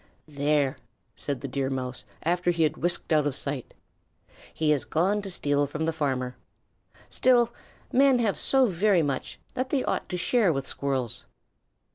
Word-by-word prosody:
"There!" 145 Hz, -2 st, +1 dB, 0.4 s
said 140 Hz, -3 st, -4 dB
the 140 Hz, -, -4 dB
Deer 135 Hz, 0 st, -2 dB
Mouse 130 Hz, -4 st, -4 dB, 0.2 s
after 175 Hz, +2 st, +1 dB
he 170 Hz, -2 st, +2 dB
had 155 Hz, -, +1 dB
whisked 175 Hz, 0 st, +1 dB
out 150 Hz, -1 st, +3 dB
of 140 Hz, -, -2 dB
sight. 140 Hz, -3 st, -4 dB, 0.8 s
"He 155 Hz, -1 st, +1 dB
has 145 Hz, -4 st, +2 dB
gone 195 Hz, +6 st, +1 dB
to 200 Hz, -, -5 dB
steal 145 Hz, -5 st, +1 dB
from 150 Hz, +3 st, -3 dB
the 165 Hz, -, 0 dB
farmer. 130 Hz, -5 st, -2 dB, 0.7 s
Still, 240 Hz, -2 st, +3 dB, 0.4 s
men 270 Hz, 0 st, +5 dB
have 225 Hz, -4 st, 0 dB
so 265 Hz, -1 st, +4 dB
very 190 Hz, -3 st, +2 dB
much 140 Hz, -3 st, -3 dB
that 255 Hz, +1 st, -2 dB
they 270 Hz, -2 st, +1 dB
ought -, -, -2 dB
to 180 Hz, -, -2 dB
share 210 Hz, +1 st, +2 dB
with 135 Hz, -3 st, -2 dB
Squirrels." 130 Hz, -4 st, -2 dB
155 Hz, 165 wpm, -27 LUFS, 140-195 Hz, 0.8 s, men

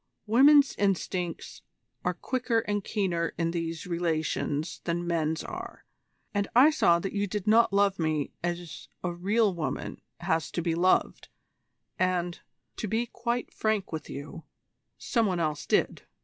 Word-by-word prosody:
Women's 275 Hz, +6 st, +6 dB
instincts 185 Hz, -3 st, -2 dB, 0.4 s
are 180 Hz, 0 st, 0 dB
quicker 240 Hz, +2 st, 0 dB
and 205 Hz, -2 st, -2 dB
keener 175 Hz, -6 st, -1 dB
in 165 Hz, -1 st, 0 dB
these 165 Hz, -1 st, -3 dB
relations 160 Hz, -3 st, -1 dB
than 175 Hz, 0 st, -1 dB
men's 160 Hz, -2 st, 0 dB
are, -, -, -8 dB, 0.5 s
and 205 Hz, -1 st, 0 dB
I 270 Hz, +6 st, +8 dB
saw 170 Hz, -, +4 dB
that 190 Hz, +3 st, -4 dB
you 205 Hz, 0 st, 0 dB
did 205 Hz, 0 st, -4 dB
not 225 Hz, +1 st, +5 dB
love 200 Hz, -1 st, +2 dB
me 155 Hz, -3 st, 0 dB
as 170 Hz, -8 st, -4 dB, 0.2 s
a 180 Hz, -1 st, -1 dB
real 200 Hz, +4 st, +2 dB
woman 165 Hz, -3 st, -4 dB, 0.2 s
has 160 Hz, -2 st, 0 dB
to 175 Hz, -, -1 dB
be 165 Hz, -1 st, +1 dB
loved, 180 Hz, +3 st, +1 dB, 0.7 s
and, 180 Hz, -1 st, 0 dB, 0.4 s
to 215 Hz, -, -3 dB
be 225 Hz, +4 st, 0 dB
quite 240 Hz, +1 st, -3 dB
frank 215 Hz, -3 st, -1 dB
with 155 Hz, -2 st, -5 dB
you, 145 Hz, +3 st, -7 dB, 0.5 s
some 230 Hz, -4 st, +1 dB
one 180 Hz, -3 st, -1 dB
else 155 Hz, -3 st, -2 dB
did. -, -, +1 dB
180 Hz, 150 wpm, -28 LUFS, 165-210 Hz, 0.7 s, I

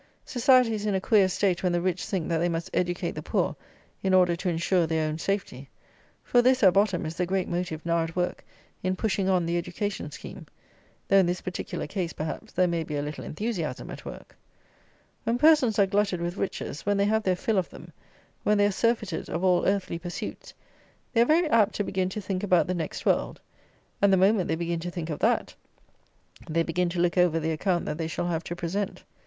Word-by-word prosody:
Society 250 Hz, -1 st, +4 dB
is 210 Hz, -1 st, -3 dB
in 205 Hz, -, +1 dB
a -, -, +2 dB
queer 195 Hz, -1 st, +4 dB
state 185 Hz, -1 st, 0 dB
when 180 Hz, -, +1 dB
the 175 Hz, -, +2 dB
rich 180 Hz, 0 st, -1 dB
think, 185 Hz, -5 st, -2 dB
that 165 Hz, -1 st, 0 dB
they 175 Hz, +1 st, +1 dB
must 165 Hz, 0 st, -3 dB
educate 175 Hz, 0 st, -1 dB
the -, -, -6 dB
poor -, -, -1 dB, 0.5 s
in 190 Hz, -1 st, +2 dB
order 180 Hz, -2 st, +4 dB
to 180 Hz, +2 st, -2 dB
insure 170 Hz, +1 st, +1 dB
their 160 Hz, -1 st, 0 dB
own 155 Hz, +1 st, -3 dB
safety: 160 Hz, -9 st, -3 dB, 0.5 s
for 245 Hz, -, +4 dB
this, 255 Hz, 0 st, +3 dB
at 185 Hz, -2 st, +7 dB
bottom, 195 Hz, -4 st, +2 dB
is 160 Hz, +1 st, -5 dB
the 180 Hz, -, +1 dB
great 190 Hz, 0 st, 0 dB
motive 170 Hz, -3 st, -3 dB
now 170 Hz, 0 st, +2 dB
at 165 Hz, 0 st, -6 dB
work 180 Hz, 0 st, -2 dB, 0.4 s
in 185 Hz, 0 st, 0 dB
pushing 195 Hz, -1 st, 0 dB
on 180 Hz, -3 st, +2 dB
the 170 Hz, +1 st, 0 dB
education 190 Hz, -1 st, -4 dB
scheme, -, -, -10 dB, 0.6 s
though 195 Hz, -, +5 dB
in 190 Hz, -2 st, +5 dB
this 180 Hz, +1 st, -1 dB
particular 185 Hz, -, -4 dB
case, 180 Hz, -4 st, -3 dB
perhaps, 160 Hz, +8 st, -5 dB
there 185 Hz, -, +2 dB
may 170 Hz, -1 st, -1 dB
be 150 Hz, -1 st, -5 dB
a 145 Hz, -, -1 dB
little 150 Hz, +1 st, -6 dB
enthusiasm 170 Hz, -, -4 dB
at -, -, -9 dB
work. -, -, -10 dB, 0.9 s
When 230 Hz, +2 st, 0 dB
persons 295 Hz, -6 st, +5 dB
are 200 Hz, -, +5 dB
glutted 200 Hz, -2 st, 0 dB
with 175 Hz, +1 st, -3 dB
riches; 185 Hz, -7 st, -4 dB
when 205 Hz, 0 st, +1 dB
they 200 Hz, -, +3 dB
have 220 Hz, +1 st, +2 dB
their 185 Hz, -3 st, +1 dB
fill 205 Hz, +2 st, 0 dB
of 180 Hz, -, -3 dB
them; -, -, -13 dB, 0.5 s
when 210 Hz, 0 st, +2 dB
they 205 Hz, -, +4 dB
are 205 Hz, -, +2 dB
surfeited 215 Hz, -5 st, -1 dB
of 170 Hz, +3 st, -3 dB
all 180 Hz, -2 st, +3 dB
earthly 195 Hz, -3 st, 0 dB
pursuits, 175 Hz, 0 st, -7 dB, 0.6 s
they 230 Hz, -, +4 dB
are -, -, +6 dB
very 325 Hz, +5 st, +3 dB
apt 220 Hz, -2 st, +4 dB
to 205 Hz, -, 0 dB
begin 185 Hz, -2 st, -1 dB
to 210 Hz, +3 st, -5 dB
think 190 Hz, -1 st, -3 dB
about 180 Hz, -6 st, +3 dB
the 180 Hz, -, -2 dB
next 165 Hz, -4 st, -4 dB
world; -, -, +1 dB, 0.6 s
and, 200 Hz, 0 st, +5 dB
the 190 Hz, -, +5 dB
moment 190 Hz, 0 st, +3 dB
they 160 Hz, -, 0 dB
begin 170 Hz, 0 st, -2 dB
to 175 Hz, +2 st, -4 dB
think 170 Hz, -2 st, -5 dB
of 150 Hz, -, -4 dB
that, -, -, +1 dB, 1.0 s
they 165 Hz, +1 st, +1 dB
begin 175 Hz, +2 st, 0 dB
to 170 Hz, 0 st, -3 dB
look 175 Hz, +1 st, +2 dB
over 175 Hz, -2 st, +3 dB
the 160 Hz, 0 st, -1 dB
account 175 Hz, +3 st, 0 dB
that 150 Hz, -, -4 dB
they 160 Hz, -, -1 dB
shall 165 Hz, -, -3 dB
have 165 Hz, -1 st, -1 dB
to 175 Hz, -, -4 dB
present. 185 Hz, +4 st, -3 dB
180 Hz, 225 wpm, -27 LUFS, 170-205 Hz, 1.0 s, at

